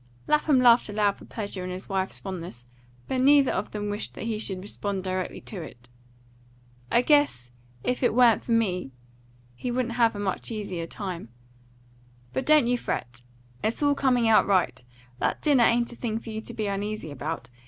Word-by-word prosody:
Lapham 300 -2 +3
laughed 240 -2 +5
aloud 205 -1 +2
for - - -15
pleasure 200 -4 -4
in 180 - -4
his 185 +1 -6
wife's 190 -1 -1
fondness; 170 -10 -7 0.4
but 260 -1 0
neither 280 0 +5
of 190 - -2
them 210 -1 -4
wished 205 +1 -4
that - - -6
he 225 -1 -2
should 190 -3 -2
respond 200 -1 -3
directly 185 -1 -3
to 195 -5 -7
it. 120 -6 -11 1.0
"I 240 - +4
guess, 285 - +2 0.3
if 250 - -1
it 245 - +2
wa'n't 240 -3 +5
for - - -6
me, 185 - 0 0.6
he 245 - -5
wouldn't 245 -1 -1
have 230 -2 +3
a - - -5
much 200 -2 -2
easier 195 -7 -4
time. 180 - -6 1.0
But 130 - -2
don't 305 -4 +6
you 245 +1 +1
fret! 120 - -4 0.4
It's 225 +6 0
all 285 0 +4
coming 250 -4 +2
out 220 - +5
right. 180 -10 +1 0.4
That - - -1
dinner 275 -6 +5
ain't 235 +1 +2
a - - -9
thing 225 -2 -3
for 225 0 -7
you 220 0 -4
to - - -8
be 215 - -2
uneasy 200 -4 -3
about. 145 -3 -5
210 Hz, 185 wpm, -26 LUFS, 185-240 Hz, 1.0 s, don't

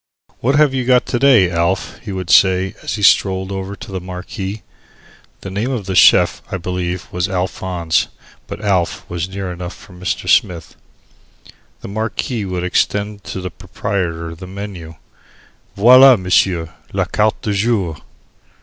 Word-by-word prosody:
"What 135 +4 +1
have 145 -2 +4
you 130 -1 -1
got 125 0 +3
to 120 - -2
day, 120 -10 +5
Alf?" 85 +3 -1
he 105 - -8
would 95 -2 -4
say, 95 0 +4
as - - -3
he 105 - -5
strolled 95 -1 +3
over 95 +1 -5
to 100 - -10
the 95 -1 -4
marquis. 95 +3 -6 0.8
The 95 - -7
name 105 +6 -2
of 120 -7 -3
the 95 - -3
Chief - - +5
was, - - -14
I - - 0
believe 90 0 -4 0.2
Alphonse, 90 -3 -1 0.4
but - - -7
"Alf" 95 -5 -1
was 85 +1 -4
near 95 -1 -5
enough 90 0 -7
for 100 - -16
Mr. 90 +1 -4
Smith. 85 -2 +1 1.1
The - - -8
marquis 110 +2 -3
would 90 -2 -3
extend 100 +3 -1
to 95 - -5
the 90 -1 -5
proprietor 85 -2 -4
the 90 +3 -10
menu, 95 -4 -8 0.8
"Voila, 125 +4 +8
m'sieu, 90 -3 +1 0.2
la 95 -1 0
carte 105 +3 0
du 105 - -1
jour." 100 -6 0
95 Hz, 160 wpm, -18 LUFS, 90-105 Hz, 1.1 s, Voila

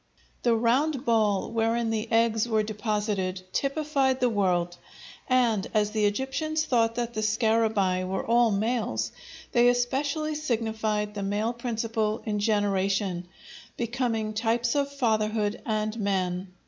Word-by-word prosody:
The 235 -2 +3
round 260 +5 +1
ball 215 -4 +2
wherein 230 0 0
the 220 +1 -3
eggs 225 0 +2
were 220 -1 +2
deposited 210 -3 -2
typified 275 -2 0
the 250 -2 +2
world, 175 -4 0 0.5
and, 235 -6 +2
as 210 -1 +2
the 215 -1 +1
Egyptians 270 +8 -1
thought 230 -2 +2
that 240 0 -2
the 215 - -2
scarabæi 215 -4 +1
were 190 +1 -2
all 235 0 +4
males, 205 - -1 0.4
they 240 0 +4
especially 280 +5 0
signified 220 -7 -1
the 205 - -4
male 205 +4 -1
principle 225 -2 -2
in 210 -2 -1
generation, 200 -3 0 0.5
becoming 235 -2 -1
types 230 +2 0
of 280 -1 0
fatherhood 215 -5 0
and 215 0 -1
man. 190 -2 -1
220 Hz, 130 wpm, -27 LUFS, 210-240 Hz, 0.5 s, all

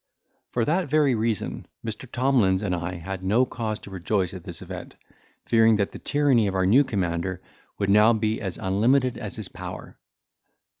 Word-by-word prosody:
For 120 -2 0
that 170 +2 0
very 150 -2 +3
reason, 110 -2 -2 0.2
Mr. 115 +3 -5
Tomlins 120 -7 +2
and 95 -3 -1
I 85 +1 -3
had 95 +2 -6
no 110 +7 +3
cause 110 -4 -3
to 100 - -11
rejoice 95 0 -1
at 90 -3 -9
this - - -6
event, - - -8 0.5
fearing 115 -1 +5
that 100 -2 0
the - - -9
tyranny 140 -7 +2
of 95 - -2
our 95 -1 +2
new 120 +10 +6
commander 95 -5 -2 0.4
would 100 -1 0
now 105 +3 +6
be 110 -1 0
as 95 -4 -4
unlimited 120 +7 +2
as 105 -6 -6
his - - -5
power. - - -9
105 Hz, 180 wpm, -25 LUFS, 95-120 Hz, 0.5 s, new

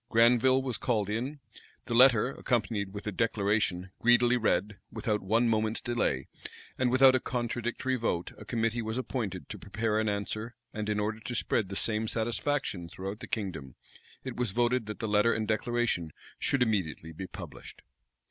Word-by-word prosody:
Granville 125 +3 +5
was 125 -4 -3
called 105 -5 0
in; 130 +7 -3 0.5
the 120 - -3
letter, 125 -1 +6
accompanied 110 -7 -1
with 100 0 -7
a 105 - -1
declaration, 100 -3 0
greedily 120 0 +5
read: 105 -3 0
without 105 -3 -1
one 115 +5 +2
moment's 110 -1 +1
delay, 120 - 0 0.5
and 130 -1 +1
without 130 +1 +7
a 130 - +3
contradictory 120 +1 -2
vote, 90 -7 -1
a - - -8
committee 115 0 0
was 110 +1 -3
appointed 105 - -3
to - - -7
prepare 105 +1 -1
an 110 -1 +1
answer: 110 +3 -3 0.2
and 105 0 -3
in 105 0 +1
order 105 +1 -1
to 120 +2 -5
spread 110 -3 0
the 100 - -5
same 110 +2 0
satisfaction 115 -5 -1
throughout 95 +4 -6
the - - -8
kingdom, 90 - -4 0.5
it 130 -2 -5
was 120 -2 0
voted 120 +2 +1
that 105 - -5
the 110 - -3
letter 105 +2 +3
and 110 -1 -2
declaration 110 -7 0 0.3
should 140 -3 +2
immediately 90 -8 -1
be 90 +4 -6
published. - - -10
110 Hz, 170 wpm, -30 LUFS, 105-120 Hz, 0.5 s, without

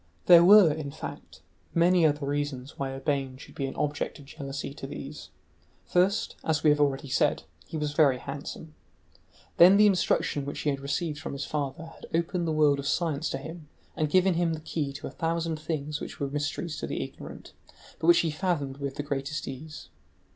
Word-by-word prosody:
There 170 -1 +9
were, 190 -4 +8
in 150 -2 -5
fact, - - -9 0.3
many 170 0 +5
other 145 -1 -1
reasons 145 -1 -3
why 135 -1 -1
Urbain 135 -1 -2
should - - -13
be 135 - -3
an 135 - -7
object 145 -1 -2
of 145 - -13
jealousy 140 0 -6
to 135 - -7
these: 140 - -8 0.6
first, 185 +4 +1
as 160 -1 0
we 155 - +6
have 150 - +2
already 140 -1 +1
said, 130 - +1 0.2
he 160 - -5
was 150 -1 -2
very 145 -4 +4
handsome, 145 +4 -7 0.8
then 185 +3 +8
the 210 - +7
instruction 180 -6 +2
which 140 +1 -5
he 150 - +1
had 135 - -3
received 150 +3 -2
from - - -6
his 140 0 -4
father 145 +1 -3
had 165 - -12
opened 170 +1 0
the - - 0
world 150 -2 +3
of 140 - -4
science 160 -2 0
to - - -2
him 160 +3 -9 0.3
and 155 -3 0
given 185 +2 +4
him 165 -1 +1
the - - -7
key 155 -2 -3
to - - -8
a - - -5
thousand 165 -1 -2
things 150 -1 -3
which - - -7
were 140 - -1
mysteries 150 +3 -3
to - - -4
the - - -2
ignorant, - - -10 0.5
but - - -2
which 345 - +7
he 165 - -1
fathomed 150 -5 -2
with 140 -1 -4
the 145 - -3
greatest 140 +1 -3
ease. 135 -5 -8
150 Hz, 200 wpm, -28 LUFS, 140-165 Hz, 0.8 s, There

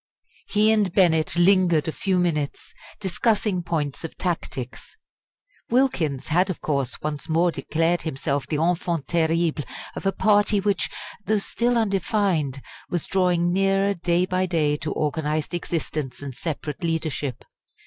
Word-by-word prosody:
He 215 +1 +3
and 210 -4 +2
Bennett 165 -4 +3
lingered 175 -3 +4
a - - 0
few 190 +3 0
minutes 155 -5 -1 0.3
discussing 205 0 0
points 155 -4 -2
of 165 - -7
tactics. 135 -8 -4 0.7
Wilkins 185 - +1
had, 180 +4 +3
of 185 - -3
course, 140 -4 -1
once 150 +1 -4
more 170 +2 +3
declared 165 +2 0
himself 140 -2 -2
the 155 - -2
enfant 170 -2 0
terrible 165 -2 +1 0.3
of - - -3
a - - +3
party 205 +1 +3
which, 200 -1 0 0.4
though 215 - +3
still 240 +4 0
undefined, 195 - 0 0.3
was 175 -3 -1
drawing 175 -2 +2
nearer 195 +1 +2
day 175 0 +1
by 185 0 0
day 155 -4 +1
to 150 0 -4
organised 150 +2 -1
existence 155 -6 -3
and 140 -2 -5
separate 150 +3 -5
leadership. 155 -5 -2
170 Hz, 140 wpm, -24 LUFS, 155-190 Hz, 0.7 s, lingered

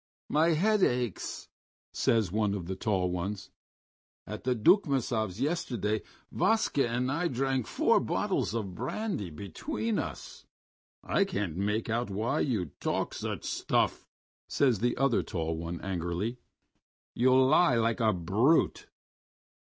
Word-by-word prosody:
"My 160 +2 +3
head 210 +6 +2
aches," 125 - -1 0.5
says 110 -6 +2
one 105 -1 +1
of 90 -4 -5
the 95 +2 -4
tall 95 -2 0
ones. 95 +3 -4 0.7
"At - - -7
the 125 -1 +2
Dukmasovs' 115 - +2
yesterday 120 - -1 0.3
Vaska 185 - +2
and 125 +2 -1
I 165 +5 0
drank 130 -2 -1
four - - +3
bottles 110 - -1
of 100 -5 -3
brandy 130 - -3
between 215 - -3
us." - - -7 0.6
"I 200 - +2
can't 105 - -3
make 105 +4 -1
out 120 0 -1
why 110 +9 -1
you 105 - -1
talk - - -1
such - - -4
stuff," - - 0 0.4
says 125 -7 +2
the 120 +1 0
other 135 -3 +2
tall 80 -1 -3
one 85 +1 -5
angrily. 95 +6 -3 0.7
"You 130 +2 +4
lie 135 +1 +5
like 115 +1 +1
a 110 -2 +3
brute." 105 - +2
115 Hz, 130 wpm, -29 LUFS, 100-135 Hz, 0.7 s, lie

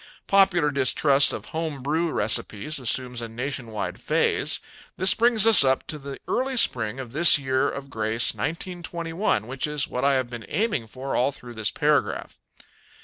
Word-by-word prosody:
Popular 190 -6 +3
distrust 140 +1 +3
of - - -6
home 160 -5 -4
brew 160 +4 -1
recipes 110 +7 -1
assumes 125 0 -1
a 115 - -6
nationwide 120 -2 -5
phase. - - +1 0.4
This 185 0 +4
brings 230 -2 +3
us 225 -9 +8
up 130 -1 +1
to 155 - -6
the 140 0 -8
early 260 0 -1
spring 120 - +1
of 125 -3 -7
this 155 +4 +5
year 130 -2 0
of 140 -1 -8
grace, 110 +1 +2
1921, 170 - -3
which 130 +5 -3
is 150 -2 -1
what 125 - -4
I 140 0 +3
have 130 -2 -1
been 120 -4 -9
aiming 205 - -1
for 130 +4 -6
all 130 +3 +2
through 125 -3 -11
this 110 -2 -1
paragraph. - - -1
135 Hz, 165 wpm, -24 LUFS, 120-165 Hz, 0.4 s, us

